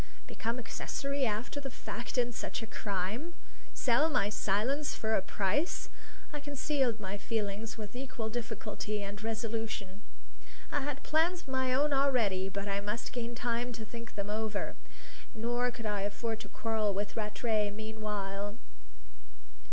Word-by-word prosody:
Become 230 +2 -1
accessory 275 +3 0
after 220 +7 -1
the 275 -1 -3
fact 235 +1 -4
in 245 0 +4
such 225 - -2
a - - -2
crime! 215 - -1 0.4
Sell 265 +6 +5
my 250 -9 +3
silence 220 +9 +2
for 220 0 +1
a 195 - +5
price! 210 - +1 0.4
I 295 - -2
concealed 285 -4 +1
my 200 0 -3
feelings 215 0 -1
with 210 0 -6
equal 255 -3 -3
difficulty 215 -2 -2
and 200 +1 -5
resolution. 220 -3 -2 0.7
I 290 - +2
had 285 0 -2
plans 335 +3 +3
of 275 - -13
my 260 -1 +2
own 285 +3 +4
already, 230 -9 +4
but 200 +1 -3
I 200 0 +1
must 210 +3 -2
gain 240 -1 -2
time 240 +1 0
to 225 -1 -5
think 230 +1 -7
them 200 0 -1
over. 215 -1 0 0.6
Nor 240 +2 +2
could 235 -2 -6
I 205 -2 +1
afford 220 +3 -1
to 210 -3 -7
quarrel 215 -3 +1
with 205 +1 -1
Rattray 210 0 +2
meanwhile. 205 -1 -2
225 Hz, 150 wpm, -34 LUFS, 205-250 Hz, 0.7 s, Sell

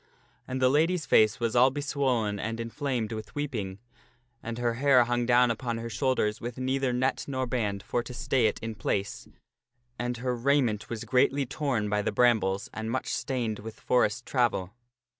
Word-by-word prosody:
And 130 +1 -3
the 130 - +4
lady's 160 +5 +2
face 110 0 +4
was 115 -1 -1
all 125 +2 +6
beswollen 130 -7 -1
and 115 +2 -3
inflamed 115 -1 -2
with 110 -1 -7
weeping, 115 -10 -3 0.6
and 115 0 -5
her 120 -1 0
hair 130 0 +5
hung 120 0 -1
down 125 0 +5
upon 115 0 -3
her 115 0 -5
shoulders 125 -5 0
with 120 0 -5
neither 130 0 0
net 130 +2 0
nor 130 -2 -1
band 105 -5 -2
for 120 - -1
to 125 - -9
stay 130 -2 +2
it 105 - -2
in 115 0 -3
place, 100 -1 -3 0.7
and 120 0 -2
her 125 +1 -1
raiment 120 -4 +1
was 115 -1 -4
greatly 130 +4 +2
torn 130 -5 -1
by 105 0 +1
the - - -1
brambles 105 -4 +2
and 110 0 -4
much 130 +3 -2
stained 120 -5 -2
with 110 +1 -9
forest 120 -1 +1
travel. 120 -7 0
120 Hz, 180 wpm, -28 LUFS, 110-130 Hz, 0.7 s, all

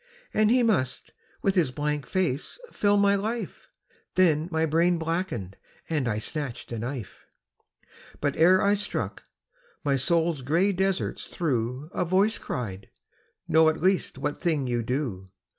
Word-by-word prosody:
And 215 0 +3
he 250 +1 +4
must 175 - 0 0.3
with 195 - +3
his 175 -8 +3
blank 145 0 -2
face 170 -7 -1
fill 205 0 +2
my 200 0 +4
life 220 +4 -3 0.5
Then 165 -3 +3
my 160 0 +2
brain 170 +3 +2
blackened; 160 - -3 0.3
and 145 -6 +1
I 105 -2 0
snatched 125 +2 -4
a 115 - -3
knife. 120 -2 -6 0.9
But 145 -1 0
ere 180 +4 +5
I 200 +1 +4
struck, 205 0 -3 0.6
my 140 -2 +2
soul's 165 +1 +1
grey 170 +10 +2
deserts 190 0 -1
through 130 -1 -2
A - - 0
voice 195 +5 +2
cried, 100 -6 -5 0.6
'Know 160 0 +5
at 160 - -2
least 185 -5 +1
what 145 +2 -3
thing 155 -6 +1
you 120 -1 0
do.' 115 -6 -3
160 Hz, 145 wpm, -26 LUFS, 130-185 Hz, 0.9 s, ere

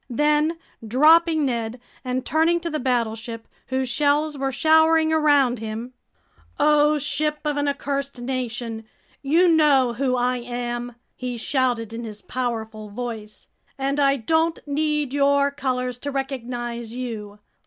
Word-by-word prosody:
Then, 300 +5 +2 0.3
dropping 315 +5 +5
Ned 235 -1 -2 0.2
and 255 0 -2
turning 325 +4 +2
to 335 - -4
the 305 - -2
battleship, 230 -2 -2 0.2
whose 260 0 -1
shells 295 +3 +1
were 270 -1 -2
showering 320 +3 +4
around 285 -6 +3
him: 225 +3 -6 0.7
"O 300 +1 +4
ship 300 +2 -1
of 295 -1 0
an 290 0 0
accursed 280 -1 -3
nation, 240 -3 -4 0.4
you 325 +6 +3
know 290 -7 +4
who 255 +1 0
I 250 0 +1
am!" 240 0 -4 0.2
he 250 -1 -4
shouted 240 -3 -1
in 235 +1 -5
his 210 -2 -8
powerful 220 -4 -4
voice. 220 -1 -7 0.3
"And 275 +1 -1
I 275 -1 +4
don't 320 +6 +1
need 300 -1 -1
your 280 0 +3
colors 255 -3 -2
to 285 - -4
recognize 240 -4 -4
you! 220 -5 -6
260 Hz, 135 wpm, -23 LUFS, 240-295 Hz, 0.7 s, dropping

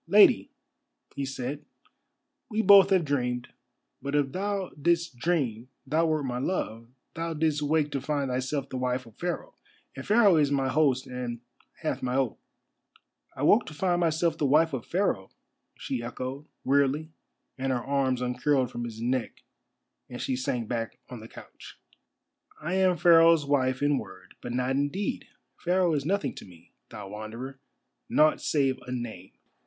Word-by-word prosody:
"Lady," 210 +6 +6 0.7
he 140 - -3
said, 135 +2 -4 0.9
"we 220 -1 0
both 200 -2 +8
have 185 -4 +3
dreamed. 125 -4 -1 0.5
But 140 +1 -3
if 140 -2 +1
thou 195 +2 -2
didst 170 0 0
dream 125 -6 -1 0.2
thou 160 +4 +2
wert 155 -2 0
my 125 -1 -2
love, 115 -7 -3 0.3
thou 165 0 -3
didst 155 -1 +1
wake 150 0 +1
to 140 - -2
find 140 -1 -1
thyself 130 +2 -2
the 130 - -4
wife 125 0 -1
of 115 -2 -18
Pharaoh. 175 0 -3 0.4
And - - -6
Pharaoh 210 -5 +5
is 145 -2 +3
my 135 -2 +1
host 135 -2 +2
and 125 -2 -5 0.4
hath 140 -4 -1
my 125 0 -1
oath." 135 -4 0 1.0
"I 130 - -4
woke 210 +10 +5
to 155 - -8
find 175 +2 +1
myself 165 0 +1
the 145 - +2
wife 155 +3 +4
of 125 -4 -4
Pharaoh," 175 - 0 0.5
she 130 -3 -3
echoed, 130 +4 -6 0.2
wearily, 140 +3 +1 0.5
and 135 0 0
her 120 -2 -1
arms 135 -2 0
uncurled 125 +1 +1
from 120 -1 -4
his 110 -2 -7
neck 125 +1 -2 0.7
and 125 - -7
she 130 - -1
sank 125 -2 -2
back 115 -2 -3
on 125 - -7
the 110 - -10
couch. - - -13 0.8
"I 160 +4 -3
am 185 -2 +3
Pharaoh's 165 -2 +6
wife 130 -2 +1
in 145 -2 +3
word, 95 -2 -11
but 120 - -6
not 125 +1 0
in 140 +2 +1
deed. 195 +5 -3 0.3
Pharaoh 180 -1 +2
is 140 -2 -1
nothing 200 +3 0
to - - -9
me, 85 -2 -18 0.2
thou 105 -2 -8
Wanderer—nought 130 +7 -2
save 135 -3 +1
a - - -5
name." 115 -7 -6
140 Hz, 165 wpm, -28 LUFS, 125-160 Hz, 1.0 s, both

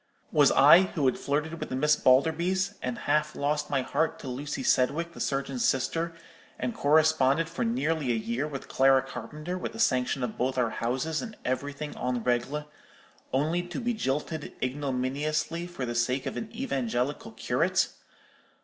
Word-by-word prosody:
Was - - +5
I, 180 - +8 0.2
who 145 - +2
had 130 - +2
flirted 150 +3 -2
with - - -5
the - - -3
Miss 150 +3 +3
Balderbys; 170 +10 +2
and 125 -1 -3
half 150 +1 +1
lost 150 +1 -1
my 135 -2 +1
heart 160 +3 0
to 145 - -9
Lucy 135 +2 -4
Sedwicke, 155 +8 +1
the - - -11
surgeon's 135 -2 -1
sister; 165 +6 0 0.4
and 240 - -2
corresponded 155 - +3
for 165 - -3
nearly 165 - 0
a - - +1
year 115 +6 -2
with 140 -3 -7
Clara 135 0 +4
Carpenter, 155 +6 -6
with - - -5
the 225 - -9
sanction 130 - +1
of 120 - -4
both 130 +1 0
our 120 -3 +1
houses, 130 +7 -1
and 220 -3 -8
everything 145 +3 -3
en 125 -2 -2
règle, 125 +5 0 0.7
only 155 +6 +1
to 175 0 -6
be 240 -1 -1
jilted 150 - -3
ignominiously 145 +5 -2
for 175 -7 -5
the 120 - -3
sake 125 +3 0
of - - -3
an 220 - -5
evangelical 135 - -2
curate? - - +1
145 Hz, 165 wpm, -28 LUFS, 130-160 Hz, 0.7 s, I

